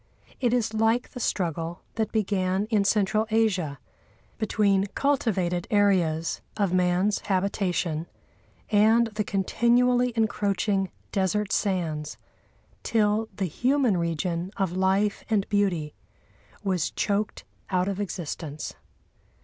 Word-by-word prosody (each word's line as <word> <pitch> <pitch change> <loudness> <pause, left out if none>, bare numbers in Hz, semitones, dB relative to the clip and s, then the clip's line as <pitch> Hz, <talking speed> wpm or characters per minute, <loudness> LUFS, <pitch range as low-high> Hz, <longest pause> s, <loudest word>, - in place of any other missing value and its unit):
It 245 -3 +2
is 235 -3 +1
like 225 +2 +1
the - - -7
struggle 170 -5 -2
that 220 -1 -1
began 195 -2 0
in 210 -2 +3
Central 215 +2 +2
Asia 190 -10 +1 0.6
between 205 -3 +2
cultivated 195 -11 0
areas 180 -6 +2 0.2
of 200 -4 +1
man's 180 +3 +2
habitation 185 -4 -1 0.6
and 220 +3 +5
the 210 0 -1
continually 245 +5 +2
encroaching 200 -3 0 0.2
desert 200 +2 0
sands, 160 -7 -1 0.6
till 220 0 +1
the 195 - -1
human 250 - +1
region 170 +1 -1
of 195 -5 0
life 190 +2 +1
and 210 -3 +1
beauty 185 -7 0 0.7
was 185 -5 0
choked 205 0 -1 0.3
out 185 -1 +1
of 200 -1 -2
existence. 160 -6 -5
200 Hz, 110 wpm, -26 LUFS, 180-220 Hz, 0.7 s, and